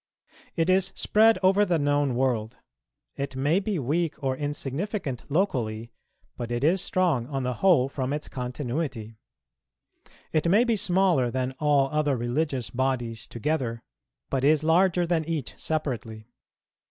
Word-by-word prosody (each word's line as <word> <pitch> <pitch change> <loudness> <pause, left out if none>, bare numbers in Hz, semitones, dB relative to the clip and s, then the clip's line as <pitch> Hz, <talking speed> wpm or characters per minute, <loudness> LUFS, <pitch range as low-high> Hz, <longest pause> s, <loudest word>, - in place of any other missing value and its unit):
It 165 -1 +1
is 185 0 +2
spread 220 +1 +4
over 195 +2 +5
the 180 -4 +1
known 145 -3 +1
world; 120 -3 -1 0.6
it 140 -1 -4
may 145 +7 +2
be 205 -1 -2
weak 155 +4 -1
or 135 -2 -1
insignificant 145 - -4
locally, 120 - -1 0.4
but 120 -1 -5
it 120 +2 -2
is 175 +5 +3
strong 165 -10 +1
on 135 -2 -3
the 125 0 -1
whole 170 -9 +5
from 135 -1 -3
its 150 +1 -3
continuity; 125 -3 -4 1.1
it 155 +1 +1
may 205 +6 +5
be 235 -2 +1
smaller 185 - +2
than 130 +1 -2
all 145 -2 +3
other 150 -3 +1
religious 125 0 -2
bodies 120 -4 -2
together, 120 -2 -2 0.5
but 135 - 0
is 150 +1 +4
larger 175 +2 +3
than 165 -2 0
each 155 -5 -3
separately. 125 -7 -3
145 Hz, 140 wpm, -26 LUFS, 125-170 Hz, 1.1 s, over